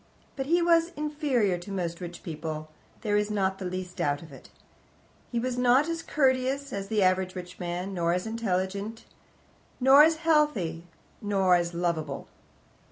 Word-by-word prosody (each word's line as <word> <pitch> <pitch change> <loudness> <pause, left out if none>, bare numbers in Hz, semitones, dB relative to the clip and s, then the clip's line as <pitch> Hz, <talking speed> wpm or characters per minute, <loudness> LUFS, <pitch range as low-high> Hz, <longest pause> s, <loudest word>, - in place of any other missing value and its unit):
But 270 -1 -3
he 340 +2 +3
was 335 0 +4
inferior 290 - 0
to 175 +3 -9
most 175 -2 -3
rich 175 0 -7
people, 155 -1 -5 0.3
there 205 -2 +1
is 210 0 0
not 190 -2 0
the 190 - -5
least 180 0 -5
doubt 145 +2 0
of 160 - -13
it. 135 - -13 0.8
He 235 - 0
was 250 +1 -2
not 250 +4 +4
as 330 0 -2
courteous 270 0 +1
as 195 0 -4
the 210 -1 +1
average 185 0 +1
rich 180 0 -8
man, 180 +2 -4
nor 170 -2 +1
as 180 +3 -1
intelligent, 205 0 -2 0.7
nor 265 +3 +8
as 320 +1 +6
healthy, 215 - +1 0.3
nor 195 -3 +2
as 175 -1 +1
lovable. 170 -2 -2
195 Hz, 165 wpm, -28 LUFS, 175-260 Hz, 0.8 s, nor